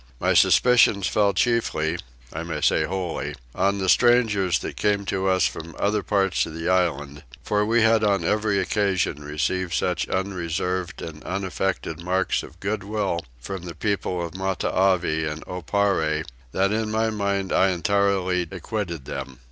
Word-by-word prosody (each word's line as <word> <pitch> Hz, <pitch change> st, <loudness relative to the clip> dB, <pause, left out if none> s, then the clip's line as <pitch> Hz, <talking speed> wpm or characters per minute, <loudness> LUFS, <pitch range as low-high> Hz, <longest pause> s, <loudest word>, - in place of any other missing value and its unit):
My -, -, +2 dB
suspicions 120 Hz, -5 st, +5 dB
fell 100 Hz, +1 st, +2 dB
chiefly, 90 Hz, -7 st, 0 dB, 0.3 s
I 80 Hz, -, -4 dB
may 85 Hz, 0 st, -4 dB
say -, -, +3 dB
wholly, 90 Hz, -2 st, -3 dB, 0.2 s
on 100 Hz, +1 st, +1 dB
the 95 Hz, -1 st, -2 dB
strangers 105 Hz, -7 st, +4 dB
that -, -, -6 dB
came 100 Hz, -1 st, 0 dB
to 95 Hz, 0 st, -1 dB
us 95 Hz, -1 st, +3 dB
from 85 Hz, +1 st, -5 dB
other 105 Hz, +1 st, +1 dB
parts 95 Hz, -2 st, +1 dB
of 80 Hz, -, -8 dB
the 80 Hz, 0 st, -4 dB
island; 75 Hz, -6 st, 0 dB, 0.2 s
for 105 Hz, 0 st, +1 dB
we 115 Hz, +1 st, +3 dB
had 110 Hz, -1 st, +4 dB
on 100 Hz, -4 st, +2 dB
every 105 Hz, +2 st, +1 dB
occasion 95 Hz, -7 st, 0 dB
received 85 Hz, +4 st, -1 dB
such 90 Hz, -2 st, -1 dB
unreserved 90 Hz, -1 st, -2 dB
and 75 Hz, -2 st, -8 dB
unaffected 95 Hz, -3 st, -3 dB
marks 95 Hz, +1 st, 0 dB
of 85 Hz, -, -13 dB
goodwill 105 Hz, -2 st, -2 dB, 0.2 s
from 95 Hz, +9 st, -6 dB
the 85 Hz, -2 st, -7 dB
people 90 Hz, -2 st, -1 dB
of 85 Hz, -, -8 dB
Matavai 95 Hz, -3 st, +1 dB
and 80 Hz, +1 st, -8 dB
Oparre 90 Hz, -4 st, 0 dB, 0.3 s
that 95 Hz, +5 st, +1 dB
in 110 Hz, 0 st, -1 dB
my 110 Hz, +1 st, +1 dB
own 110 Hz, -1 st, -1 dB
mind 100 Hz, -2 st, -1 dB
I 95 Hz, -, +4 dB
entirely 95 Hz, -1 st, +1 dB
acquitted 95 Hz, -, -4 dB
them. 65 Hz, -1 st, -6 dB
95 Hz, 155 wpm, -24 LUFS, 85-100 Hz, 0.3 s, suspicions